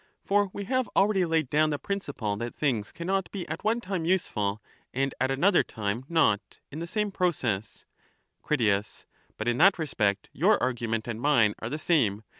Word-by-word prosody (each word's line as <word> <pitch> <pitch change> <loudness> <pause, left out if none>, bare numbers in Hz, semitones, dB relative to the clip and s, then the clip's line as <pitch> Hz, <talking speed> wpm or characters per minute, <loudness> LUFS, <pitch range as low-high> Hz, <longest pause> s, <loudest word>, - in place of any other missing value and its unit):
For 205 0 +2
we 200 - -5
have 255 +3 0
already 195 -2 +3
laid 160 -3 +1
down 155 +1 +3
the 145 - -1
principle 145 - -3
that 120 +2 -5
things 120 -8 -1
cannot 190 +2 -2
be 190 -3 -5
at - - -5
one 225 +2 +1
time 185 -5 -3
useful 110 - 0 0.4
and 135 +1 0
at 130 - +2
another 175 +8 +4
time 110 +4 -4
not, 145 -11 +1
in 150 - -6
the 170 - -4
same 210 +3 -1
proce 125 - -1 0.6
Crit. 110 -8 0 0.3
But 110 - -4
in 120 +2 +1
that 190 +3 +6
respect 105 - 0
your 200 +9 +3
argument 115 -3 -1
and 115 -1 -4
mine 120 -8 +4
are 110 - -4
the 150 +4 -4 0.3
me. 100 +2 -9
145 Hz, 180 wpm, -27 LUFS, 110-185 Hz, 0.6 s, that